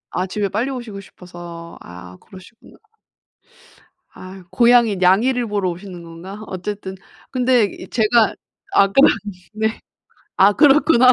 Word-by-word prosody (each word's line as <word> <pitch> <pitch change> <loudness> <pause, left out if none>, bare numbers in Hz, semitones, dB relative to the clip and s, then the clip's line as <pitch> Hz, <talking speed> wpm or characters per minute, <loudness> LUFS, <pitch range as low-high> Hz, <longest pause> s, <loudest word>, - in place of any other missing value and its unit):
아 185 - -1
집에 205 +2 -2
빨리 215 +7 -2
오시고 240 -7 -7
싶어서. 175 -3 -11
아 90 +1 -12
그러시구나. 190 - -17 1.3
아 185 0 -12
고양이 235 -3 +4
냥이를 225 +7 +2
보러 205 -3 -1
오시는 180 0 -10
건가? 170 +5 -10
어쨌든 190 +1 -6 0.4
근데 250 -2 +2
이 200 - -9
제가 225 0 +2 0.4
아까 195 0 +3 0.6
네. 220 +1 -2 0.6
아 195 +2 +5
그렇구나. 275 -1 +5
200 Hz, 255 characters per minute, -19 LUFS, 185-235 Hz, 1.3 s, 아